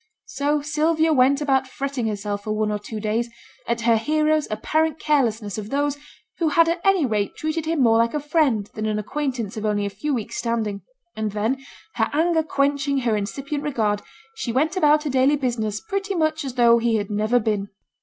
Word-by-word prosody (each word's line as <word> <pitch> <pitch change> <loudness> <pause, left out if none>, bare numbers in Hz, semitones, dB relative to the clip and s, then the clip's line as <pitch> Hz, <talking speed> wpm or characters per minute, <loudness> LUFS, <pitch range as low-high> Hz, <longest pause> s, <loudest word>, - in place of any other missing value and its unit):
So 290 +1 -1
Sylvia 315 +1 +2
went 275 +1 +4
about 270 -2 +2
fretting 270 -2 -3
herself 205 -1 -3
for 215 - -1
one 215 0 0
or 210 - -2
two 215 +1 -7
days, 220 +3 -1 0.4
at 235 0 -1
her 230 -1 +4
hero's 305 +5 +1
apparent 310 +9 0
carelessness 230 -10 0
of 210 0 -7
those 285 +1 0 0.4
who 330 -2 +2
had 330 +3 +4
at 340 +1 0
any 390 -6 +4
rate 210 -4 -1
treated 315 0 -3
him 320 -4 +2
more 225 -1 +5
like 230 +4 +1
a - - +1
friend 285 -8 +1
than 215 0 -3
an 215 -1 0
acquaintance 240 -2 -3
of 215 - -4
only 205 -1 0
a 200 - -3
few 215 +10 -3
weeks' 225 -4 -4
standing; 220 -4 -2 0.3
and 215 -2 -3
then, 230 +6 -1 0.3
her 225 -1 +2
anger 325 +2 +2
quenching 280 -2 0
her 235 -3 +1
incipient 275 +8 -3
regard, 220 -8 0 0.3
she 270 - -4
went 305 +8 +1
about 300 -4 +4
her 300 - -2
daily 265 +3 +4
business 230 -6 -2
pretty 395 +2 -3
much 315 -1 0
as 265 -3 -5
though 235 -1 +5
he 230 -1 +1
had 205 -1 -2
never 215 +4 +2
been. 210 -3 -1
260 Hz, 200 wpm, -23 LUFS, 215-300 Hz, 0.4 s, more